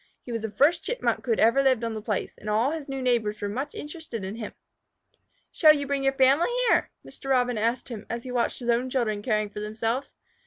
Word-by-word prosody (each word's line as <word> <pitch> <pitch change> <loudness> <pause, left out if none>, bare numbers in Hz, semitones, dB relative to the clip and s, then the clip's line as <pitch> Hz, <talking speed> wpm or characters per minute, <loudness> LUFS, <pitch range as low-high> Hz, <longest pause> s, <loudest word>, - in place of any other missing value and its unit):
He 245 - -8
was 230 -1 -2
the 220 - -3
first 285 - +3
Chipmunk - - -1
who 245 - -2
had 225 - +2
ever 230 +5 +5
lived 260 -4 +2
on 230 -1 -2
the 215 - -5
place, 210 -2 -3
and 210 - -8
all 225 +6 +2
his 310 -3 -5
new 270 -1 -3
neighbors 220 -4 +1
were 205 - -2
much 255 +8 -4
interested 295 - -7
in 190 +1 -4
him. 220 -3 -5 1.0
"Shall 310 -2 +6
you 285 -1 -2
bring 280 0 -1
your 270 0 +2
family 270 - +4 0.2
here?" - - +3 0.2
Mr. 270 - -9
Robin 250 -2 +2
asked 230 +5 -1
him, 220 -4 -7
as 235 0 -4
he 255 - -7
watched 240 -1 0
his 240 -1 -5
own 240 +2 +2
children 230 -5 -1
caring 215 -2 0
for 210 - -6
themselves. 225 +5 -3
Mr. - - -47
240 Hz, 240 wpm, -26 LUFS, 220-270 Hz, 1.0 s, Shall